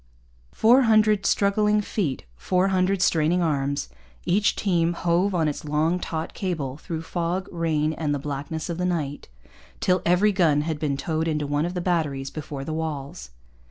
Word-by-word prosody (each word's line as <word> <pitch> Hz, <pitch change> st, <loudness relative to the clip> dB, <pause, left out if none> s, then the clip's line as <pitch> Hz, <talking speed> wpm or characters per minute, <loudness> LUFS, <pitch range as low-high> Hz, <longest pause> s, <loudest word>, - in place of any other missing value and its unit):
Four 240 Hz, +4 st, +5 dB
hundred 215 Hz, -2 st, +4 dB
struggling 210 Hz, +1 st, +2 dB
feet, 185 Hz, -, -2 dB
four 185 Hz, -, +1 dB
hundred 185 Hz, 0 st, +1 dB
straining 170 Hz, +2 st, +2 dB
arms 140 Hz, -, -1 dB, 0.4 s
each 200 Hz, +4 st, +2 dB
team 175 Hz, -4 st, +1 dB
hove 175 Hz, +3 st, +1 dB
on 160 Hz, -3 st, +2 dB
its 150 Hz, -, -3 dB
long, 155 Hz, +4 st, 0 dB
taut 160 Hz, -2 st, -4 dB
cable 155 Hz, -9 st, -3 dB
through 165 Hz, 0 st, -5 dB
fog, 175 Hz, +2 st, -2 dB
rain, 160 Hz, -3 st, 0 dB
and 155 Hz, -2 st, -2 dB
the 145 Hz, -, +1 dB
blackness 145 Hz, +3 st, -4 dB
of 170 Hz, -1 st, -4 dB
the -, -, -1 dB
night, 150 Hz, -, -3 dB, 0.5 s
till 180 Hz, -1 st, +2 dB
every 180 Hz, +5 st, +3 dB
gun 165 Hz, -7 st, +3 dB
had 155 Hz, 0 st, -3 dB
been 145 Hz, -3 st, -1 dB
towed 160 Hz, +2 st, -2 dB
into 150 Hz, -2 st, -1 dB
one 145 Hz, +3 st, 0 dB
of 180 Hz, -, -6 dB
the 180 Hz, -, -1 dB
batteries 150 Hz, -7 st, -1 dB
before 145 Hz, -3 st, -6 dB
the 155 Hz, -, -4 dB
walls. 145 Hz, -, -5 dB
165 Hz, 170 wpm, -24 LUFS, 150-180 Hz, 0.5 s, Four